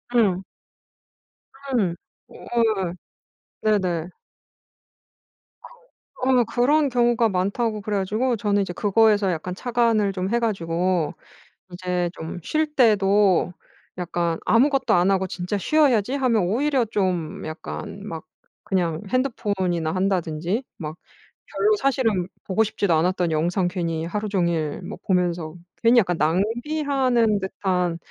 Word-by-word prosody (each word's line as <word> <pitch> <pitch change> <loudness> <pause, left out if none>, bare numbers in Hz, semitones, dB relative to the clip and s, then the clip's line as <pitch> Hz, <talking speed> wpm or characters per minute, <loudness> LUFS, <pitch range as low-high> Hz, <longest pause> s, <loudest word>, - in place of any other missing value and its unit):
응. 195 -5 +3 1.4
응. 180 -6 +1 0.3
어어 - - -15 0.5
예. - - -6 0.8
네네. 180 -4 0 1.5
그 - - -13 0.5
어 255 -2 +4
그런 275 +5 +2
경우가 240 -2 +2
많다고 210 +4 -1
그래 205 0 -2
가지고 220 +6 0
저는 205 -1 +1
이제 180 - -4
그거에서 210 -2 +3
약간 180 +3 -4
착안을 230 -3 +1
좀 185 0 -3
해 235 - +2
가지고 180 -5 0 0.6
이제 180 -1 -2
좀 165 +2 -7
쉴 310 - -1
때도 200 -6 +3 0.5
약간 170 -1 -1
'아무것도 270 +2 +3
안 180 +2 +3
하고 190 0 +1
진짜 180 +3 -3
쉬어야지.' 260 - +2
하면 250 -6 +2
오히려 255 +7 +1
좀 180 -7 -2
약간 160 +4 -7
막 165 -5 -6 0.4
그냥 170 -4 0
핸드폰이나 190 -10 -1
한다든지 185 - -1
막 155 0 -6 0.5
별로 425 0 +2
사실은 225 - +1 0.2
보고 205 +3 +1
싶지도 200 -4 0
않았던 175 +1 +1
영상 175 +4 +1
괜히 170 -3 -2
하루 210 +4 -3
종일 170 -6 -1
뭐 - - -7
보면서 175 -3 0 0.3
괜히 235 +1 +5
약간 175 -5 0
낭비하는 235 - +1
듯한 180 -3 -1
195 Hz, 250 characters per minute, -23 LUFS, 175-230 Hz, 1.5 s, 괜히